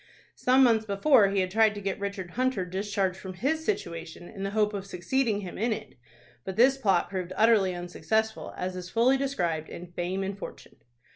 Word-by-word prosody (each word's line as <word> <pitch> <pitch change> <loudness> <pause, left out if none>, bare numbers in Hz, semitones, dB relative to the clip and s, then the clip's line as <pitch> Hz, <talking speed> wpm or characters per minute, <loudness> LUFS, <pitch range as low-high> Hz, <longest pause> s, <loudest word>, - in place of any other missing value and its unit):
Some 260 +1 +4
months 225 -3 +3
before 205 +2 +5
he 195 -1 +1
had 185 0 -2
tried 220 0 +4
to - - -5
get 195 0 -3
Richard 200 -3 -4
Hunter 255 -6 0
discharged 190 0 -2
from 190 -1 -8
his 300 - -1
situation 170 - -4
in 200 -3 -10
the 195 - -1
hope 210 0 +1
of 195 -1 -5
succeeding 205 +4 0
him 185 -2 -7
in 230 +3 +1
it; 215 0 -4 0.5
but 190 - -5
this 260 +4 +5
plot 195 -9 +2
proved 185 -2 -4
utterly 215 -5 +4
unsuccessful, 220 +5 -2
as 185 0 -3
is 180 -1 -6
fully 240 +6 +3
described 175 - -1
in 175 0 -9
"Fame 180 +2 -2
and 195 +1 -4
Fortune." - - -10
200 Hz, 195 wpm, -28 LUFS, 185-225 Hz, 0.5 s, before